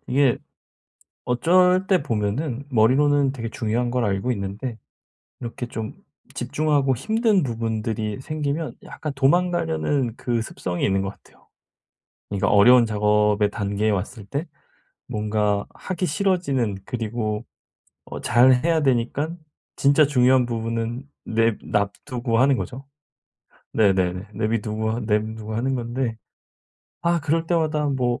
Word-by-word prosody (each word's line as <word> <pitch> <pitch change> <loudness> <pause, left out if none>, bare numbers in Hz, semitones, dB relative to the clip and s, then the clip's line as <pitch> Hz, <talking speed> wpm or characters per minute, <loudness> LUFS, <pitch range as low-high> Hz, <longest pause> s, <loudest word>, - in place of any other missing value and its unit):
이게 135 -1 +3 0.9
어쩔 180 +8 +3
때 190 -4 +3
보면은 120 +3 -2
머리로는 135 +4 +3
되게 115 -4 -5
중요한 120 0 -1
걸 125 -1 0
알고 100 +4 0
있는데 110 +3 -5 0.6
이렇게 120 0 -5
좀 110 -2 -5 0.4
집중하고 140 +1 +1
힘든 215 - +2
부분들이 110 -3 -2
생기면 155 +2 -3
약간 150 - -6
도망가려는 160 -4 +1
그 120 -2 -1
습성이 90 -5 -4
있는 95 -1 +2
것 95 - -3
같아요. - - -20 0.8
그러니까 100 -1 0
어려운 120 +4 +7
작업의 105 -1 +2
단계에 100 +1 -1
왔을 105 +3 -3
때 140 - -3 0.6
뭔가 105 -1 0
하기 185 0 -3
싫어지는 155 - 0
그리고 110 -2 -3 0.6
어 - - -7
잘 125 +3 +5
해야 165 -1 +2
되니까 135 +2 +1 0.5
진짜 140 +2 +4
중요한 130 -2 +4
부분은 115 +1 -3 0.2
내 115 0 +2
놔두고 115 +3 -1
하는 135 +1 +4
거죠. 130 +3 -6 0.9
네네네. 95 -2 +2
내비두고 110 0 -1
하 115 - -2
내비두고 110 0 -2
하는 130 +4 0
건데 120 -1 -2 0.9
아 170 0 +2
그럴 160 +2 0
때마다 155 -3 +1
뭐 125 -3 0
120 Hz, 275 characters per minute, -23 LUFS, 110-145 Hz, 0.9 s, 어려운